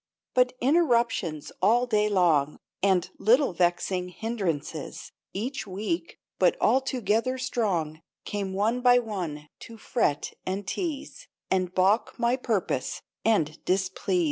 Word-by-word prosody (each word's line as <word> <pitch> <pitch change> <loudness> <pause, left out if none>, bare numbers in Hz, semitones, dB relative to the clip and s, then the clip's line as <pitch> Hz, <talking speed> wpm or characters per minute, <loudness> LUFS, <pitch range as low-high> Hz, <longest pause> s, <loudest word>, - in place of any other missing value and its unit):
But 250 0 +3
interruptions 235 - +1
all 240 +3 +4
day 210 -3 +2
long, 160 -7 +2 0.2
And 190 -3 +3
little 245 +1 +4
vexing 180 +1 0
hindrances, 180 -8 -4 0.2
Each 220 +2 -4
weak, 215 - -3 0.2
but - - +4
all 265 - +4
together 250 0 0
strong, 180 -12 -1 0.2
Came 200 -2 -3
one 215 +6 0
by 245 0 +6
one 180 -11 -3
to 230 - -11
fret 215 - -1
and 190 +2 -3
tease, 335 - -4 0.2
And 185 -1 0
balk 195 +5 +2
my 235 +1 +2
purpose, 230 -7 -2 0.2
and 160 -9 +1
displease. 190 0 0
210 Hz, 120 wpm, -27 LUFS, 180-245 Hz, 0.2 s, by